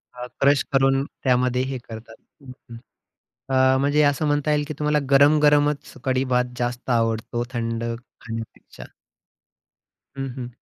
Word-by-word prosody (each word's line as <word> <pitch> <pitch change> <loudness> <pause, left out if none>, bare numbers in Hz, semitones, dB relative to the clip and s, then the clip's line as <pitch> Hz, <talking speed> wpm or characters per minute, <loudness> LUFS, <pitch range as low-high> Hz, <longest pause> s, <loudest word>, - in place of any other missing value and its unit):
हां, 125 0 -7
क्रश 140 0 +4
करून 135 0 +3 0.2
त्यामध्ये 125 -1 +2
हे 130 - -3
करतात 110 0 -10 0.3
हं, 135 -2 -11 0.2
हं, 115 - -8 1.0
अ, - - +2
म्हणजे 145 +2 +2
असं 145 +2 +1
म्हणता 145 +1 +1
येईल 150 0 +1
की 155 - -4
तुम्हाला 150 0 +1
गरम-गरमच 145 +1 +3
कढी-भात 130 -1 0
जास्त 120 +1 -3
आवडतो 115 0 0
थंड 115 -1 -3 0.4
खाण्यापेक्षा. 115 -1 -9 1.3
हं, 135 0 -3
हं. 125 - -5
130 Hz, 130 wpm, -23 LUFS, 120-145 Hz, 1.3 s, क्रश